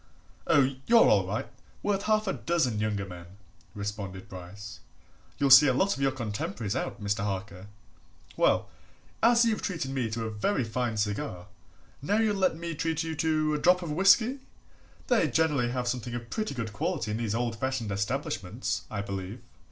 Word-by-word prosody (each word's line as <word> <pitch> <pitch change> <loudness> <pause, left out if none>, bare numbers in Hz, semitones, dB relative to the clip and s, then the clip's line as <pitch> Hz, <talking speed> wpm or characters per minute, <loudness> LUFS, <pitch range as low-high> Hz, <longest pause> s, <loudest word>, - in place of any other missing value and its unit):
"Oh, 135 -2 +3
you're 230 -1 +7
all - - +3
right! - - -2 0.4
worth 200 -1 +1
half 215 0 +2
a 190 - 0
dozen 130 -11 0
younger 105 -2 -1
men," 90 -2 -10 0.5
responded 100 -2 -5
Bryce. 95 0 -9 0.6
"You'll 140 -1 +2
see 135 +2 +10
a 130 - +3
lot 195 +8 +2
of 140 - -7
your 135 -1 +3
contemporaries 110 -2 -4
out, 130 - -3
Mr. 105 0 -1
Harker. 100 -1 -4 0.7
Well - - +2 0.5
as 235 +1 +5
you've 225 -2 0
treated 165 -9 -3
me 130 -4 -1
to 115 +1 -3
a 110 - -3
very 130 - 0
fine 115 0 -2
cigar, 105 -4 -2 0.6
now 200 +10 +1
you'll 220 -2 +2
let 185 -4 +1
me 170 0 -4
treat 160 +1 -1
you 160 -1 -4
to 155 -1 +1
a 150 - 0
drop 180 +3 +4
of 165 - -4
whisky? 205 - +4 0.7
they 240 -10 +3
generally 145 -3 +1
have 125 0 -2
something 120 -1 -3
of 120 -1 -7
pretty 215 -9 -2
good 115 -3 -4
quality 105 +1 -2
in 105 - -1
these 115 -2 -2
old 120 -1 -1
fashioned 130 -4 -2
establishments, 100 0 -2
I 100 -2 -3
believe." 100 +3 -5
125 Hz, 175 wpm, -28 LUFS, 105-165 Hz, 0.7 s, see